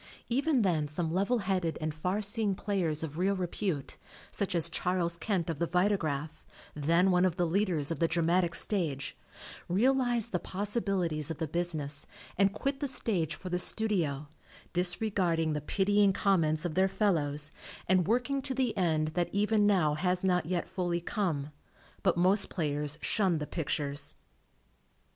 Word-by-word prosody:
Even 270 Hz, 0 st, +2 dB
then 160 Hz, -6 st, +1 dB
some 160 Hz, +2 st, -2 dB
level 200 Hz, +7 st, +2 dB
headed 180 Hz, -4 st, 0 dB
and 155 Hz, -1 st, -2 dB
far 180 Hz, +7 st, -1 dB
see 205 Hz, +3 st, -1 dB
ing 200 Hz, -3 st, +1 dB
players 175 Hz, -7 st, -1 dB
of 160 Hz, +1 st, -5 dB
real 195 Hz, +2 st, +2 dB
repute, 180 Hz, -5 st, -3 dB, 0.3 s
such 200 Hz, -2 st, -1 dB
as 165 Hz, -1 st, +3 dB
Charles 170 Hz, 0 st, -1 dB
Kent, 180 Hz, -1 st, -1 dB
of 165 Hz, -4 st, -3 dB
the 170 Hz, -, +1 dB
Vitagraph, 160 Hz, -5 st, 0 dB, 0.3 s
then 170 Hz, +6 st, +2 dB
one 180 Hz, 0 st, +3 dB
of 185 Hz, -3 st, +2 dB
the 175 Hz, -, +1 dB
leaders 170 Hz, -4 st, +1 dB
of 165 Hz, -, -3 dB
the 165 Hz, -, +3 dB
dramatic 170 Hz, +1 st, +1 dB
stage, 160 Hz, -10 st, 0 dB, 0.5 s
realized 240 Hz, +3 st, +2 dB
the 180 Hz, -, 0 dB
possibilities 190 Hz, -, -1 dB
of 160 Hz, -, -4 dB
the 160 Hz, -, -2 dB
business 150 Hz, -3 st, -2 dB, 0.3 s
and 195 Hz, +1 st, +3 dB
quit 275 Hz, +5 st, -2 dB
the 285 Hz, -, -1 dB
stage 185 Hz, -, -1 dB
for 185 Hz, -, -8 dB
the 180 Hz, 0 st, 0 dB
studio, 175 Hz, -8 st, +1 dB, 0.5 s
disregarding 175 Hz, -3 st, +1 dB
the 150 Hz, -, -2 dB
pitying 200 Hz, +5 st, +2 dB
comments 165 Hz, -5 st, +1 dB
of 170 Hz, -, -2 dB
their 190 Hz, +2 st, +3 dB
fellows 155 Hz, -8 st, 0 dB, 0.4 s
and 185 Hz, -2 st, +3 dB
working 250 Hz, +5 st, +1 dB
to 265 Hz, 0 st, -3 dB
the 250 Hz, -4 st, 0 dB
end 160 Hz, -5 st, +1 dB
that 170 Hz, +1 st, -1 dB
even 210 Hz, +1 st, +2 dB
now 180 Hz, -7 st, +3 dB
has 180 Hz, +4 st, 0 dB
not 180 Hz, -4 st, +1 dB
yet 175 Hz, -1 st, -1 dB
fully 175 Hz, -2 st, -1 dB
come, 170 Hz, -6 st, -2 dB, 0.5 s
but 185 Hz, -3 st, +2 dB
most 190 Hz, +3 st, +3 dB
players 150 Hz, -2 st, -1 dB
shunned 190 Hz, -7 st, +2 dB
the 150 Hz, -, -3 dB
pictures. 145 Hz, -3 st, -1 dB
180 Hz, 160 wpm, -30 LUFS, 160-200 Hz, 0.5 s, as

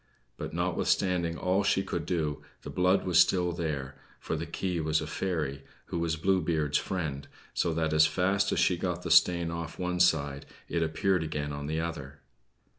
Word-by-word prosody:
But -, -, -6 dB
notwithstanding 85 Hz, -3 st, 0 dB
all 95 Hz, +2 st, +1 dB
she 95 Hz, -1 st, +2 dB
could 85 Hz, -5 st, -4 dB
do, 80 Hz, -5 st, -1 dB, 0.2 s
the -, -, -6 dB
blood 90 Hz, +2 st, +2 dB
was 90 Hz, -2 st, +4 dB
still 90 Hz, 0 st, +4 dB
there, 75 Hz, -6 st, -4 dB, 0.2 s
for -, -, -3 dB
the -, -, -4 dB
key 90 Hz, -3 st, -2 dB
was 80 Hz, 0 st, +1 dB
a -, -, -4 dB
fairy, 75 Hz, -7 st, -3 dB, 0.2 s
who 85 Hz, -, -4 dB
was 85 Hz, -1 st, 0 dB
Blue 95 Hz, +3 st, +2 dB
Beard's 75 Hz, -4 st, +1 dB
friend, 75 Hz, -7 st, -4 dB, 0.3 s
so 85 Hz, -, +1 dB
that 80 Hz, -1 st, 0 dB
as 80 Hz, 0 st, +6 dB
fast 95 Hz, +5 st, +1 dB
as -, -, 0 dB
she 90 Hz, -, +3 dB
got 90 Hz, 0 st, -3 dB
the -, -, -3 dB
stain 85 Hz, -2 st, +5 dB
off 85 Hz, -1 st, -5 dB
one 90 Hz, 0 st, -2 dB
side 70 Hz, -5 st, +2 dB, 0.2 s
it 85 Hz, -, -1 dB
appeared 85 Hz, +3 st, +1 dB
again 75 Hz, -2 st, -3 dB
on 70 Hz, 0 st, -5 dB
the 80 Hz, +1 st, -1 dB
other. 70 Hz, -4 st, -5 dB
85 Hz, 190 wpm, -29 LUFS, 75-90 Hz, 0.3 s, as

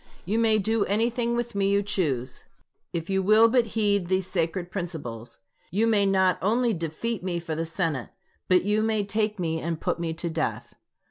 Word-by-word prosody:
You 210 Hz, +6 st, 0 dB
may 220 Hz, -1 st, +4 dB
do 220 Hz, +1 st, +1 dB
anything 235 Hz, +3 st, 0 dB
with 240 Hz, 0 st, -2 dB
me 200 Hz, -1 st, +1 dB
you 200 Hz, 0 st, +2 dB
choose, 140 Hz, -11 st, -2 dB, 0.5 s
if 165 Hz, -1 st, -4 dB
you 190 Hz, 0 st, +1 dB
will 215 Hz, +4 st, +6 dB
but 235 Hz, 0 st, +2 dB
heed 200 Hz, -4 st, +2 dB
these 185 Hz, 0 st, +1 dB
sacred 175 Hz, 0 st, -2 dB
principles. 125 Hz, -, -6 dB, 0.3 s
You 210 Hz, +6 st, +1 dB
may 210 Hz, -3 st, +3 dB
not 190 Hz, -1 st, +2 dB
only 230 Hz, +4 st, +2 dB
defeat 175 Hz, +6 st, -3 dB
me 180 Hz, -2 st, -2 dB
for 165 Hz, -1 st, -5 dB
the 165 Hz, +1 st, -2 dB
Senate, 165 Hz, -6 st, -2 dB, 0.4 s
but 185 Hz, -1 st, +4 dB
you 210 Hz, +2 st, +1 dB
may 220 Hz, -1 st, +1 dB
take 210 Hz, +1 st, -1 dB
me 165 Hz, -3 st, -1 dB
and 165 Hz, -1 st, -3 dB
put -, -, -2 dB
me 165 Hz, -1 st, -2 dB
to 170 Hz, +1 st, -3 dB
death. 160 Hz, -1 st, -3 dB
190 Hz, 190 wpm, -26 LUFS, 165-215 Hz, 0.5 s, will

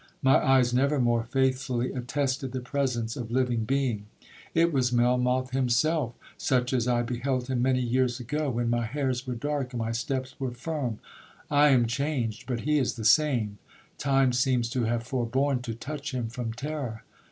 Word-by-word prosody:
My 135 Hz, 0 st, +5 dB
eyes 130 Hz, -2 st, +4 dB
never 140 Hz, +3 st, +2 dB
more 120 Hz, -2 st, +2 dB
faithfully 130 Hz, -1 st, 0 dB
attested 130 Hz, 0 st, -2 dB
the 130 Hz, -, -2 dB
presence 125 Hz, -3 st, -2 dB
of 120 Hz, -4 st, -5 dB
living 120 Hz, -2 st, +1 dB
being. 120 Hz, -5 st, -1 dB, 0.5 s
It 165 Hz, 0 st, +3 dB
was 125 Hz, -3 st, +2 dB
Melmoth 125 Hz, +1 st, +2 dB
himself, 130 Hz, +1 st, +1 dB, 0.2 s
such 125 Hz, -1 st, +1 dB
as 125 Hz, -2 st, +1 dB
I 120 Hz, -1 st, +2 dB
beheld 125 Hz, +2 st, -2 dB
him 125 Hz, -2 st, 0 dB
many 130 Hz, 0 st, +2 dB
years 125 Hz, 0 st, +1 dB
ago, 145 Hz, +5 st, -2 dB
when 120 Hz, -1 st, -1 dB
my 120 Hz, 0 st, +1 dB
hairs 130 Hz, -1 st, -2 dB
were 125 Hz, -, -2 dB
dark 140 Hz, 0 st, -2 dB
and 120 Hz, -, -3 dB
my 115 Hz, 0 st, -1 dB
steps 130 Hz, +2 st, -2 dB
were 130 Hz, -2 st, -2 dB
firm. 130 Hz, -3 st, -3 dB, 0.5 s
I 145 Hz, 0 st, +6 dB
am 130 Hz, -4 st, +5 dB
changed, 120 Hz, -3 st, -2 dB
but 120 Hz, -3 st, -2 dB
he 150 Hz, 0 st, +2 dB
is 130 Hz, -, 0 dB
the 110 Hz, -3 st, -5 dB
same—time 130 Hz, +1 st, +1 dB
seems 125 Hz, -2 st, +1 dB
to 125 Hz, -2 st, 0 dB
have 115 Hz, +1 st, 0 dB
forborne 130 Hz, +2 st, 0 dB
to 115 Hz, -2 st, -5 dB
touch 140 Hz, +3 st, -5 dB
him 120 Hz, -3 st, -2 dB
from 120 Hz, -1 st, -4 dB
terror. 130 Hz, -3 st, -5 dB
125 Hz, 175 wpm, -27 LUFS, 120-135 Hz, 0.5 s, I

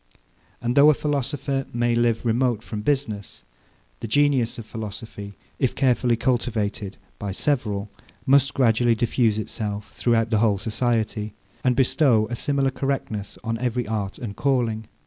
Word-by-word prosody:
And 120 Hz, +1 st, 0 dB
though 145 Hz, +2 st, +8 dB
a 155 Hz, -, +5 dB
philosopher 140 Hz, -1 st, -1 dB
may 120 Hz, 0 st, +1 dB
live 120 Hz, 0 st, +1 dB
remote 120 Hz, -1 st, +1 dB
from 105 Hz, -3 st, -5 dB
business, 110 Hz, -, -2 dB, 0.5 s
the -, -, -5 dB
genius 135 Hz, -1 st, +2 dB
of 115 Hz, -, -7 dB
philosophy, 105 Hz, -2 st, -7 dB, 0.2 s
if 130 Hz, -, +1 dB
carefully 125 Hz, -2 st, +2 dB
cultivated 110 Hz, -5 st, -1 dB, 0.2 s
by 100 Hz, -2 st, -3 dB
several, 105 Hz, -5 st, -1 dB, 0.4 s
must 135 Hz, 0 st, +4 dB
gradually 120 Hz, -2 st, +3 dB
diffuse 115 Hz, -2 st, +1 dB
itself 105 Hz, -1 st, -4 dB
throughout 115 Hz, -1 st, +1 dB
the 110 Hz, -, +3 dB
whole 105 Hz, -3 st, +3 dB
society, 110 Hz, -1 st, -1 dB, 0.3 s
and 125 Hz, -1 st, +3 dB
bestow 125 Hz, -3 st, +3 dB
a -, -, -1 dB
similar 140 Hz, +1 st, +1 dB
correctness 130 Hz, -7 st, -3 dB
on 115 Hz, 0 st, -2 dB
every 125 Hz, -1 st, -1 dB
art 105 Hz, -3 st, -3 dB
and 105 Hz, -4 st, -6 dB
calling. 115 Hz, -5 st, 0 dB
115 Hz, 145 wpm, -24 LUFS, 110-130 Hz, 0.5 s, though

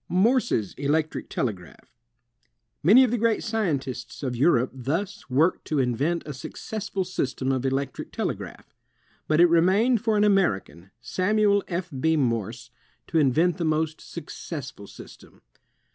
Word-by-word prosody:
SAMUEL -, -, -8 dB
F. -, -, +5 dB
B. 225 Hz, -, +6 dB
MORSE 255 Hz, -2 st, +1 dB
213 -, -, +2 dB
Morse's 140 Hz, +8 st, -5 dB
Electric 155 Hz, +1 st, -1 dB
Telegraph 100 Hz, -4 st, -5 dB, 0.9 s
Many 220 Hz, -, +7 dB
of 250 Hz, -, +1 dB
the 240 Hz, -, 0 dB
great 230 Hz, -1 st, +1 dB
scientists 145 Hz, -, -3 dB
of 125 Hz, -2 st, -2 dB
Europe 125 Hz, -1 st, +3 dB
thus 165 Hz, -, -4 dB
worked 155 Hz, +8 st, +2 dB
to 155 Hz, -, -2 dB
invent 140 Hz, +7 st, 0 dB
a 150 Hz, -, -6 dB
successful 200 Hz, +8 st, -5 dB
system 135 Hz, -7 st, -2 dB
of 130 Hz, 0 st, 0 dB
electric 135 Hz, 0 st, -3 dB
telegraph. -, -, -5 dB, 0.5 s
But 155 Hz, +1 st, +2 dB
it 175 Hz, -, +8 dB
remained 190 Hz, +8 st, +3 dB
for 220 Hz, -2 st, +1 dB
an 205 Hz, -, +3 dB
American, 105 Hz, -, +1 dB
Samuel 200 Hz, -, +2 dB
F. 175 Hz, 0 st, -4 dB
B. 160 Hz, +3 st, +2 dB
Morse, 115 Hz, -2 st, -2 dB, 0.3 s
to 165 Hz, -, +1 dB
invent 155 Hz, +5 st, +2 dB
the 175 Hz, -, -2 dB
most 155 Hz, 0 st, -1 dB
successful 145 Hz, -, -8 dB
system. -, -, -14 dB
160 Hz, 155 wpm, -25 LUFS, 130-195 Hz, 0.9 s, it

